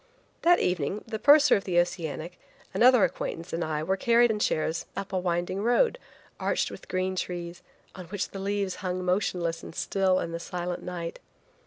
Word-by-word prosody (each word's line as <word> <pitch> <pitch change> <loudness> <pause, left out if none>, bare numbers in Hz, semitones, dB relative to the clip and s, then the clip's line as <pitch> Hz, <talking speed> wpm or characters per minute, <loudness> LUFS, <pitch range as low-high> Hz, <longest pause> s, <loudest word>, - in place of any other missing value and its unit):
That 345 +1 +5
evening 180 +3 -1
the 220 -2 -5
purser 290 +3 +7
of 200 - -1
the 180 -2 -1
Oceanic, 170 -1 -3 0.3
another 250 -2 +6
acquaintance 165 - -3
and 170 +1 -1
I 155 -1 -2
were 190 +4 0
carried 235 +3 +4
in 210 - -2
chairs 160 -4 0
up 195 0 -5
a 185 - +1
winding 175 +2 -1
road, 245 - +2 0.4
arched - - 0
with - - -10
green 185 0 -1
trees, 175 -1 -4 0.3
on 185 -2 -9
which 200 +2 -3
the 195 - -7
leaves 200 -1 -2
hung 185 -1 -2
motionless 180 -3 0
and - - -10
still 190 -1 +1
in 170 - -3
the 170 - -4
silent 175 0 -4
night. 170 -2 -5
185 Hz, 180 wpm, -27 LUFS, 170-200 Hz, 0.4 s, purser